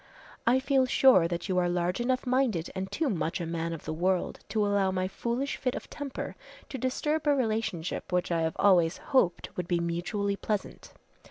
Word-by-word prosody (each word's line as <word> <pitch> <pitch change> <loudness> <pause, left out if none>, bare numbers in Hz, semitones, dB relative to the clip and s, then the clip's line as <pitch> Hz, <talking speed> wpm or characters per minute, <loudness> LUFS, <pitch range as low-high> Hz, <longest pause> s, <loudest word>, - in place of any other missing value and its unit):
"I 250 +2 +5
feel 265 -1 +2
sure 245 -10 +5
that 170 +3 -4
you 185 -2 +1
are 175 -1 +1
large 175 +4 0
enough 255 +2 0
minded 250 -10 +1
and 190 +1 -4
too 320 - 0
much 170 -8 -1
a 170 - -3
man 165 0 -2
of 165 - -7
the - - -3
world 180 +3 0
to 215 -2 +1
allow 200 -1 +2
my 185 0 -1
foolish 240 +7 -2
fit 255 -2 -1
of - - -8
temper 285 -3 -5 0.3
to 265 - -5
disturb 295 +5 -1
a 290 - +5
relationship 220 -11 -2
which 180 0 0
I 165 -1 +1
have 160 0 -1
always 175 -4 +4
hoped 195 -11 0
would 180 -2 -3
be 175 -1 +1
mutually 175 +4 -1
pleasant. 210 0 -4
195 Hz, 195 wpm, -29 LUFS, 175-255 Hz, 0.3 s, I